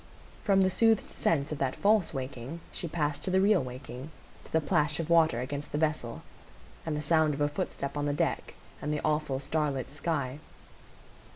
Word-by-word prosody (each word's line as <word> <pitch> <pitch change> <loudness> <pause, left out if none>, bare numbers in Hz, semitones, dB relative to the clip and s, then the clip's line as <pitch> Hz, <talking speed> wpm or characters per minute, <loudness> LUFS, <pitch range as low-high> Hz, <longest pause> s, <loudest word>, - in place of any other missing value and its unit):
From 195 -1 +4
the 190 0 +3
soothed 225 +1 +3
sense 145 -2 +1
of 150 - -3
that 130 -1 0
false 205 -4 +3
waking 135 +3 -5
she 170 - -4
passed 150 -3 -1
to - - -1
the 190 +1 +3
real 195 -4 +4
waking,—to 130 +3 -10
the 160 - +4
plash 150 -2 +1
of 165 0 -2
water 160 -8 +5
against 145 +3 -5
the 145 - -1
vessel, 150 -7 -1 0.6
and 155 -2 0
the 150 - -3
sound 155 -1 +3
of 145 - -5
a 145 - +4
footstep 140 -1 -3
on 145 0 -1
the - - +1
deck, - - -1 0.3
and 150 - -2
the 150 - -1
awful 150 -3 0
starlit 140 -2 -1
sky. 145 -3 -2
150 Hz, 185 wpm, -30 LUFS, 140-165 Hz, 0.6 s, water